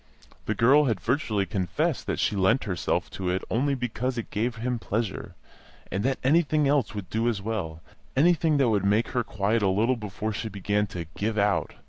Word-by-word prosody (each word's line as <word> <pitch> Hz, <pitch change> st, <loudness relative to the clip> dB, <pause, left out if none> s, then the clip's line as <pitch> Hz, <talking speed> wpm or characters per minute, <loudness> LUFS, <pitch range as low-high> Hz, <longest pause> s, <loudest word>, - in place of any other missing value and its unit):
The 110 Hz, -, 0 dB
girl 140 Hz, +8 st, +5 dB
had 115 Hz, -7 st, 0 dB
virtually 110 Hz, -, 0 dB
confessed 90 Hz, -1 st, -1 dB
that -, -, -1 dB
she -, -, +1 dB
lent 100 Hz, +7 st, +3 dB
herself 90 Hz, -6 st, -1 dB
to 95 Hz, -2 st, -3 dB
it 90 Hz, +1 st, -1 dB
only 140 Hz, +4 st, +1 dB
because 125 Hz, 0 st, -2 dB
it 115 Hz, -, -5 dB
gave 115 Hz, +3 st, -1 dB
him 120 Hz, +1 st, -2 dB
pleasure, 110 Hz, -1 st, -3 dB, 0.6 s
and 100 Hz, +2 st, -1 dB
that 135 Hz, +1 st, +1 dB
anything 150 Hz, +1 st, +3 dB
else 140 Hz, -6 st, +1 dB
would 100 Hz, -3 st, -6 dB
do 115 Hz, +2 st, +1 dB
as 110 Hz, -4 st, -1 dB
well, 85 Hz, -7 st, -4 dB, 0.3 s
anything 160 Hz, +1 st, +3 dB
that 135 Hz, -4 st, +3 dB
would 105 Hz, -3 st, +1 dB
make 105 Hz, +3 st, +2 dB
her 125 Hz, -1 st, 0 dB
quiet 110 Hz, +1 st, 0 dB
a 100 Hz, -, +2 dB
little 110 Hz, +7 st, +2 dB
before 105 Hz, 0 st, -4 dB
she 110 Hz, +1 st, -4 dB
began 105 Hz, +1 st, -1 dB
to 85 Hz, -3 st, -6 dB
"give 110 Hz, +1 st, -2 dB
out." 100 Hz, 0 st, +1 dB
110 Hz, 195 wpm, -26 LUFS, 100-125 Hz, 0.6 s, girl